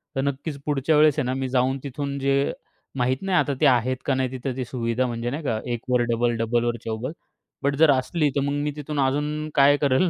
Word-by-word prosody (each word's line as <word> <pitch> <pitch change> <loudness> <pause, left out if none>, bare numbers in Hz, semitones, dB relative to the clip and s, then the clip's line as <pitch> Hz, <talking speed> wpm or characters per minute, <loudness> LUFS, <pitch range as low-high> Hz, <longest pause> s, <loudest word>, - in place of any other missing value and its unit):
तर 135 - +1
नक्कीच 140 +2 -3
पुढच्या 150 +1 +1
वेळेस 150 -1 +5
आहे 140 - 0
ना, 130 - -1
मी 130 0 -2
जाऊन 130 +1 +1
तिथून, 140 0 -4
जे 140 +1 +1 0.4
माहीत 125 +1 +1
नाही, 195 -2 +1
आता 145 - +2
ते - - +5
आहेत 130 -1 +3
का 140 - +2
नाही 130 -1 -1
तिथं 130 0 -4
ती 130 - -2
सुविधा, 120 0 -1
म्हणजे 120 0 -3
नाही 145 +6 -4
का? 115 -6 -1
एक 120 -2 -3
वर 125 -1 +3
डबल, 120 +1 +1
डबल 115 +1 +1
वर 120 0 0
चौबल. 115 +4 -3 0.5
बट, 140 0 +1
जर 155 +1 +6
असली 145 +4 +1
तर 140 - +2
मग 140 +1 -1
मी 150 - -1
तिथून 150 0 -4
अजून 150 +3 0
काय 140 +1 +6
करेल, 145 +5 +2
135 Hz, 230 wpm, -24 LUFS, 125-145 Hz, 0.5 s, जर